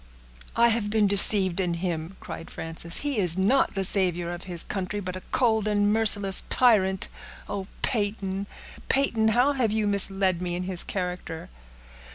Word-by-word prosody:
"I 235 0 +4
have 225 -2 0
been 215 0 +2
deceived 195 -2 +4
in 175 -2 -1
him," 170 0 -4
cried 165 - -9
Frances. 165 +1 -3
"He 280 -6 -1
is 180 -2 +2
not 205 +7 +2
the 195 - -1
savior 175 -3 0
of 175 - -8
his 175 -3 -1
country; 195 +1 -4
but 185 -2 -6
a 185 - -7
cold 220 -4 +1
and 205 0 +1
merciless 205 -3 +5
tyrant. 190 -6 +2 0.4
Oh! 195 -2 -5 0.2
Peyton, 200 -3 -2 0.4
Peyton! 235 -5 +1
how 245 +6 +2
have 245 -6 0
you 215 0 0
misled 195 -3 0
me 175 -1 -3
in 180 - -4
his 180 -1 -1
character!" 180 -3 -5
195 Hz, 165 wpm, -25 LUFS, 180-215 Hz, 0.4 s, merciless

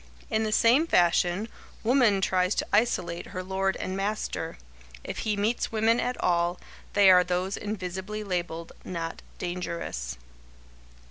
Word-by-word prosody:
In 220 - +2
the 215 - -1
same 245 +9 +4
fashion, 175 - +3 0.4
woman 230 -5 +4
tries 185 0 +2
to - - 0
isolate 180 -6 +1
her 185 - -5
lord 190 +1 0
and 185 - -4
master. 205 - -3 0.5
If - - -5
he 215 -2 -1
meets 215 +4 0
women 225 +2 +3
at 250 - -2
all, 175 0 +1 0.3
they 200 -2 +7
are 180 -1 +7
those 180 +2 -1
invisibly 205 +1 -4
labeled 175 -4 -3
"not 165 -2 -5 0.2
dangerous." 170 - -4
190 Hz, 135 wpm, -27 LUFS, 175-215 Hz, 0.5 s, they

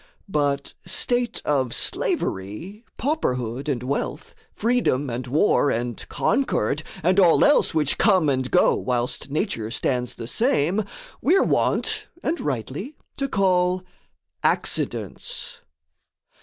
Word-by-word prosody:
But 140 -4 0
state 240 +6 0
of 135 -5 +1
slavery, 105 - -2
pauperhood, 130 - -1
and 125 -4 -1
wealth, 140 +4 -3 0.2
Freedom, 205 - +1
and 125 +2 -4
war, 145 +2 +3
and 120 -1 -3
concord, 150 - 0 0.2
and 185 +4 +3
all 175 -4 +6
else 295 - +4
Which 150 -3 +1
come 190 -7 +4
and 130 -2 0
go - - +4
whilst 125 +2 -2
nature 140 - -2
stands 125 +1 -1
the - - -7
same, 195 - +1 0.4
We're 365 +6 +4
wont, - - 0 0.2
and 330 +3 0
rightly, 145 - -4 0.2
to 275 0 -2
call 185 -3 +2 0.6
accidents. - - -1
150 Hz, 115 wpm, -24 LUFS, 125-205 Hz, 0.6 s, all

